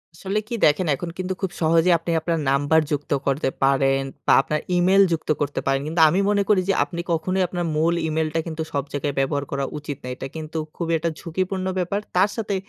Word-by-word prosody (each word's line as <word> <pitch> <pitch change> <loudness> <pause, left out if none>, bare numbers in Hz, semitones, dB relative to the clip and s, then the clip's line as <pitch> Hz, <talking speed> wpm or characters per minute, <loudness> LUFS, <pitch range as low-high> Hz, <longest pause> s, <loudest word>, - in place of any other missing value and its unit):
আসলে 195 +5 -2
কি 235 - -3
দেখেন 160 +4 +3
এখন 170 +6 -6
কিন্তু 185 0 -2
খুব 190 -2 -1
সহজেই 165 +2 +4
আপনি 170 +1 -3
আপনার 165 0 -1
নাম্বার 145 +3 +3
যুক্ত 145 -1 -3 0.2
করতে 135 0 +1
পারেন 135 0 +3 0.3
বা - - +6
আপনার 150 +2 -2 0.2
ইমেইল 190 +3 +5
যুক্ত 160 -1 -2
করতে 145 0 -1
পারেন। 135 0 +1
কিন্তু 165 +2 +1
আমি 175 +5 +1
মনে 205 -1 +2
করি 200 -3 +4
যে - - +4
আপনি 170 +4 -5
কখনোই 185 +3 +1
আপনার 175 0 -3
মূল 160 +2 +2
ইমেইলটা 160 0 -1
কিন্তু 160 -1 -4
সব 140 - -1
জায়গায় 145 0 -2
ব্যবহার 140 +1 0
করা 140 0 -1
উচিত 145 -2 -6
না। - - -7
এটা 135 - -6
কিন্তু 160 0 -6 0.2
খুবই 165 -1 -1
একটা 165 +1 -1
ঝুঁকিপূর্ণ 185 +3 -3
ব্যাপার। 185 +3 -1 0.2
তার 185 +3 +4
সাথে 210 -3 -2
165 Hz, 210 wpm, -23 LUFS, 145-185 Hz, 0.3 s, বা